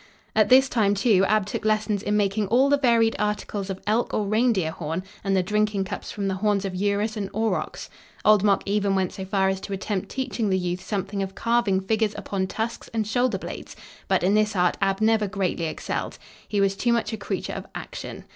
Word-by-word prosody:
At 215 -1 +4
this 265 +1 +7
time, 210 -5 +2
too, 195 -2 +3
Ab 215 -2 +2
took 205 - -4
lessons 215 -1 +1
in 210 0 0
making 205 0 +1
all 255 +6 +4
the 285 - +4
varied 230 -4 +3
articles 205 -1 -2
of 190 -1 -4
elk 220 +3 +1
or 210 - 0
reindeer 215 -5 +2
horn 160 +2 -4 0.2
and 195 -1 +1
the 185 - +2
drinking 210 0 +1
cups - - -6
from 200 -1 -3
the 190 - 0
horns 205 0 +1
of 190 - -3
urus 205 +3 0
and 200 -2 -3
aurochs. 220 0 -1 0.4
Old 210 -2 +6
Mok 200 -2 +3
even 200 -1 +1
went 190 -2 0
so 190 - -6
far 190 0 +1
as 190 0 -2
to 200 - -5
attempt 195 0 -3
teaching 235 -5 -2
the 190 - +2
youth 180 0 -2
something 200 0 -3
of 195 0 -4
carving 230 -5 +1
figures 215 +2 0
upon 195 -2 -2
tusks 225 +4 -4
and 220 -1 +1
shoulder 245 0 +1
blades, - - -8 0.3
but 190 -2 +2
in 190 +3 +3
this 215 0 +2
art 180 -1 +2
Ab 195 +1 +1
never 220 -1 +3
greatly 190 -4 -1
excelled. 155 - -4 0.3
He 205 - -1
was 195 0 +2
too 240 +4 +1
much 230 -1 0
a - - -2
creature 200 - -4
of - - -6
action. - - -7
205 Hz, 215 wpm, -25 LUFS, 195-220 Hz, 0.4 s, this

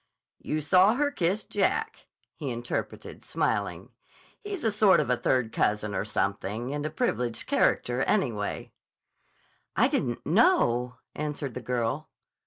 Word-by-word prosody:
"You 155 - -2
saw 185 +8 +5
her 290 +2 +1
kiss 195 -3 0
Jack," 445 - -1 0.3
he 145 -4 -5
interpreted, 120 0 -5
smiling. - - -1 0.5
"He's 405 -4 -5
a 225 - +2
sort 210 -2 +5
of 125 - 0
a - - +4
third 125 -2 0
cousin 105 0 0
or 95 - -1
something, 105 +5 -2
and 145 0 -3
a - - -4
privileged 120 -6 -1
character, 125 +1 +1
anyway." 120 - -1 1.0
"I - - +4
didn't 120 -1 -2
know," 140 - +3 0.2
answered 150 -3 -4
the 125 - -5
girl. 125 +4 -2
135 Hz, 135 wpm, -27 LUFS, 120-195 Hz, 1.0 s, saw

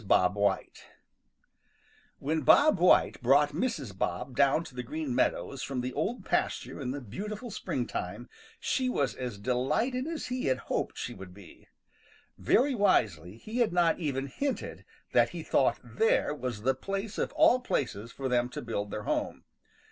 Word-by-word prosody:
BOB 90 0 +4
WHITE 100 -1 -1 1.3
|WHEN 155 +3 -1
Bob 280 - +6
White 180 - +4
brought 140 +4 +4
Mrs. 150 - -2
Bob 120 +8 -3
down 140 +5 +3
to 135 - -12
the 125 - -4
Green 145 +2 -4
Meadows 130 +1 0
from 135 -2 -3
the 125 +1 -4
Old 225 +12 -2
Pasture - - -1
in 125 - -3
the 140 +3 -3
beautiful 210 - -6
springtime, - - -4 0.3
she 260 -1 0
was 140 - 0
as 125 -5 -5
delighted 150 - 0
as 330 -1 -4
he 250 0 -3
had 130 - +2
hoped - - -3
she - - -4
would 95 -1 -11
be. 100 -5 -15 0.7
Very 270 +3 +3
wisely 105 - +1
he 220 - -5
had 235 -6 +3
not 175 -1 +2
even 135 -5 -2
hinted 270 - -4 0.3
that - - +5
he - - -6
thought - - +2
there 450 - +1
was 125 -7 -5
the 135 +2 +3
place 195 +8 -4
of - - -1
all 255 - +5
places 120 - -2
for 135 +2 -4
them 125 -1 +1
to 125 - -6
build 105 -3 -3
their 105 - -5
home. - - -2
135 Hz, 165 wpm, -29 LUFS, 120-205 Hz, 1.3 s, Bob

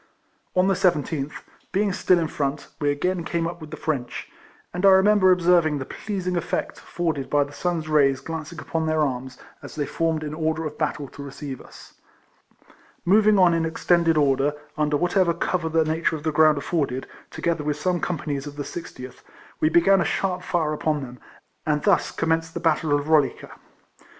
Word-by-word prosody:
On 185 +1 +4
the 195 - +3
17th, 150 -5 0 0.4
being 200 0 +1
still 185 0 +3
in 165 -2 0
front, 145 -1 -3
we 145 -2 +1
again 175 +5 -1
came 170 0 -1
up 170 0 -5
with 155 - -9
the 155 - -7
French, 135 -6 -3 0.5
and^ 180 +1 -4
I 195 - +8
remember 190 0 +5
observing 170 -4 +3
the 135 - -5
pleasing 185 -1 -4
effect 175 - -2
afforded 160 -6 -3
by 145 -1 +3
the 145 +1 -10
sun's 170 -2 -2
rays 140 -3 +3
glancing 160 +3 -6
upon 160 +1 -2
their 155 0 +1
arms, 130 -2 -3 0.2
as - - -10
they 150 -2 -1
formed 160 +1 -1
in 150 -1 -5
order 160 0 -1
of 150 -1 -5
battle 150 -2 -2
to - - -11
receive 140 -1 -7
us. - - -15 1.1
Moving 210 +3 +5
on 180 -3 +5
in 165 -1 +1
extended 165 0 +2
order, 140 0 +2 0.2
under 150 -1 +1
what 175 +4 -1
ever 180 -4 +3
cover 175 -3 -1
the 160 0 +2
nature 160 +1 0
of 150 - -8
the 155 - 0
ground 155 0 +5
afforded, 140 -4 -2 0.2
together 170 -3 -2
with 150 0 -1
some 175 +3 0
companies 150 -4 -3
of 145 - -8
the 145 - -4
60tb, 130 -6 -9 0.4
we 155 - +3
began 175 +4 +4
a - - +3
sharp 185 0 -1
fire 165 -4 -1
upon 150 -1 -1
them; 125 -1 -10 0.4
and 150 -1 0
thus 195 -6 +3
commenced 165 0 -1
the - - -2
battle 160 -2 +1
of 145 0 +2
Rolica. 155 -4 +4
RIFLEMAN - - -13
HARRIS. - - -15
160 Hz, 195 wpm, -24 LUFS, 145-175 Hz, 1.1 s, I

